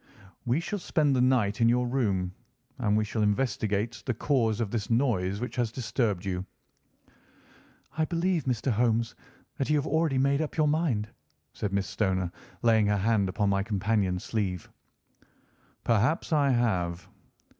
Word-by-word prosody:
"We 125 +6 +2
shall 200 +4 -3
spend 150 -5 +1
the 125 - +2
night 120 -5 +2
in 115 - +5
your 125 +1 +2
room, 100 -8 0 0.5
and 105 -3 +2
we 110 - +1
shall 110 +1 -2
investigate 105 -1 0
the 125 - 0
cause 115 -4 +1
of 110 -4 -2
this 110 -4 -2
noise 110 -6 +1
which 125 +2 -5
has 120 -3 0
disturbed 110 -5 -1
you." 90 -1 -2 1.5
"I 160 - +1
believe, 170 -1 0
Mr. 125 0 0
Holmes, 115 0 +1 0.5
that 135 - -1
you 150 - +3
have 145 - +1
already 160 -3 +1
made 140 +2 +2
up 155 - -4
your 155 -1 +3
mind," 145 -9 +1 0.5
said 105 - -3
Miss 100 0 0
Stoner, 95 -4 -1 0.3
laying 110 -3 +4
her 105 0 +2
hand 100 -1 +2
upon 100 +2 0
my 100 0 +2
companion's 100 -2 0
sleeve. 95 -6 -3 1.1
"Perhaps 120 +10 +1
I 145 -2 +3
have." 95 -9 0
115 Hz, 155 wpm, -28 LUFS, 100-135 Hz, 1.5 s, in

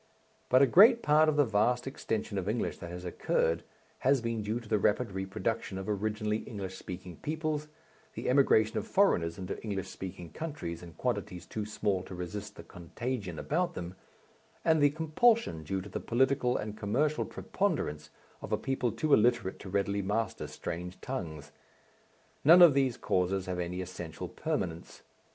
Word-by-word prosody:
But 130 +2 +6
a - - +8
great 230 - +7
part 155 +1 +5
of 155 - +1
the 145 - +5
vast 120 +3 +2
extension 110 -6 -3
of 95 +2 -3
English 115 +2 -2
that 85 - -7
has 90 +1 -7
occurred 80 -1 0 0.4
has 135 +1 +3
been 115 -1 -2
due 110 +3 -2
to 120 - -13
the 105 -1 +2
rapid 105 +3 +1
reproduction 95 +1 -3
of 95 - -5
originally 105 +1 -1
English 100 -4 -6
speaking 90 -3 -8
peoples, 155 -1 -2 0.5
the - - -4
emigration 125 -5 +4
of - - -7
foreigners 85 - +2
into 90 -1 -5
English 100 -4 -3
speaking 90 -3 -8
countries 145 - -5
in 85 -1 -11
quantities 100 -7 -3
too 105 +4 -4
small 105 -3 0
to 90 - -9
resist 90 +4 -6
the - - -10
contagion 100 +1 -5
about 170 - -1
them, 85 +1 -5 0.7
and 160 -2 +4
the 145 - +6
compulsion 160 - +2
due 95 +5 -3
to 100 - -9
the - - -4
political 130 +1 +2
and 105 0 -4
commercial 145 +9 +1
preponderance 75 - -2 0.3
of - - -7
a - - +2
people 130 -3 -1
too 150 +6 0
illiterate 115 -4 +3
to 95 - -8
readily 100 +1 0
master 105 +2 -2
strange 90 +2 -6
tongues. 80 - -5 0.9
None 170 +5 +9
of 165 -5 +9
these 135 -3 +1
causes 95 +1 0
have 90 -1 -3
any 90 +1 -3
essential 85 -3 -6
permanence. 85 0 -4
105 Hz, 170 wpm, -31 LUFS, 90-135 Hz, 0.9 s, None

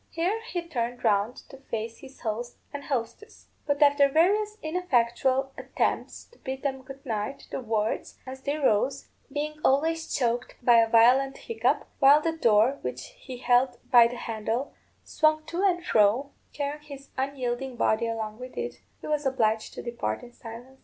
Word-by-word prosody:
Here 370 +7 -1
he 350 -2 -2
turned 245 -5 -3
round 210 +1 +2
to 270 - -11
face 230 -4 -5
his 270 0 -14
host 235 +2 -4 0.2
and 285 0 -5
hostess; 280 - -5 0.2
but 285 0 +3
after 285 -1 +5
various 410 +8 +2
ineffectual 270 -5 +1
attempts - - -2
to 480 - -22
bid 265 0 -6
them 270 -2 -2
good 270 +1 -12
night, 220 +2 -4
the - - -3
words, 220 -2 -2
as 265 0 -8
they 285 +2 -2
rose, 270 0 +1 0.2
being 300 +1 -3
always 320 +4 +2
choked 240 -1 -1
by 240 -1 +6
a 225 -1 +4
violent 255 +4 +5
hiccup, 460 -1 0
while 285 +1 +7
the 325 +1 -1
door, 235 -1 +3
which 125 0 -5
he 255 -2 -8
held 245 0 +2
by 240 -2 +8
the 240 - -6
handle, 225 +4 -3 0.3
swung 310 0 +2
to 345 +2 -3
and 355 -3 +2
fro, 225 +7 +3 0.2
carrying 290 +1 -4
his 280 -2 -11
unyielding 265 -1 -2
body 225 0 +1
along 220 -1 -4
with 255 0 -9
it, - - -4 0.2
he - - -7
was 300 -2 0
obliged 220 -4 0
to - - -6
depart 235 - -3
in 245 - -12
silence. 245 +4 -11
265 Hz, 170 wpm, -27 LUFS, 235-290 Hz, 0.3 s, by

